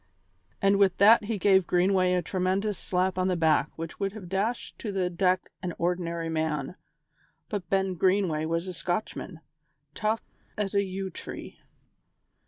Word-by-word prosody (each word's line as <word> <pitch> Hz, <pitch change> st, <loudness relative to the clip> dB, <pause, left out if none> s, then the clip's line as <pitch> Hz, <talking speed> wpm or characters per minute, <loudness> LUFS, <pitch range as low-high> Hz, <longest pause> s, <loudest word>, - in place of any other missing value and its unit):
And 195 Hz, 0 st, +5 dB
with 195 Hz, -3 st, +3 dB
that 215 Hz, +2 st, +7 dB
he 220 Hz, 0 st, -2 dB
gave 190 Hz, -2 st, +4 dB
Greenway 185 Hz, 0 st, +3 dB
a 180 Hz, -1 st, +1 dB
tremendous 190 Hz, +3 st, -1 dB
slap 185 Hz, 0 st, 0 dB
on 185 Hz, -, +2 dB
the 185 Hz, -, +1 dB
back 160 Hz, -3 st, +3 dB
which 165 Hz, 0 st, -7 dB
would 195 Hz, -1 st, -1 dB
have 200 Hz, -5 st, -9 dB
dashed 205 Hz, +6 st, -2 dB
to 215 Hz, -, -4 dB
the 185 Hz, -2 st, -1 dB
deck 185 Hz, +1 st, +1 dB
an 180 Hz, -2 st, -4 dB
ordinary 170 Hz, -1 st, -1 dB
man, 155 Hz, -2 st, -1 dB, 0.8 s
but 195 Hz, -6 st, -4 dB
Ben 190 Hz, -1 st, +1 dB
Greenway 180 Hz, -3 st, +1 dB
was 165 Hz, +3 st, -1 dB
a 185 Hz, -, -4 dB
Scotchman, 175 Hz, -1 st, -4 dB, 0.5 s
tough 220 Hz, +3 st, 0 dB, 0.4 s
as 205 Hz, -2 st, -2 dB
a 200 Hz, -, +4 dB
yew 190 Hz, 0 st, -4 dB
tree. -, -, -8 dB
185 Hz, 160 wpm, -28 LUFS, 175-195 Hz, 0.8 s, that